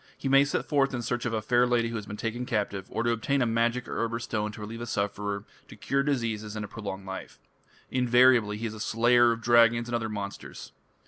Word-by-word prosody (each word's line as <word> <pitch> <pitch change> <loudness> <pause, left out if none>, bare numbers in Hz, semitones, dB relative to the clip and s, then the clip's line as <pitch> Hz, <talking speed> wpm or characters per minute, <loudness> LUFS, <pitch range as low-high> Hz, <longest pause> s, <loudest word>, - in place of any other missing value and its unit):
He - - -4
may 135 +1 +6
set 145 - -2
forth 135 -3 +1
in 120 - -4
search 120 +1 -2
of 115 - -3
a 110 -1 -1
fair 120 +2 +3
lady 120 -1 +1
who 115 - -5
has 105 -2 -5
been 105 - -6
taken 115 +3 -3
captive, 100 -5 -2
or 115 - -2
to 120 - +2
obtain 115 +5 0
a 125 - +2
magic 115 +2 0
herb 115 0 -2
or - - 0
stone 105 -2 -3
to - - -10
relieve 115 +2 -7
a 120 - -5
sufferer, 100 -1 -2 0.2
to - - -12
cure 140 0 0
diseases, 115 -7 -2
and 105 - -4
to - - -5
prolong 100 -2 -7
life. 95 0 -7 0.5
Invariably 125 -4 +4
he 115 - -4
is 110 - -3
a 110 - -9
slayer 120 +2 +4
of 115 0 -3
dragons 115 0 +4
and 120 - -2
other 115 -1 -2
monsters. 100 -2 -7
115 Hz, 240 wpm, -27 LUFS, 105-120 Hz, 0.5 s, may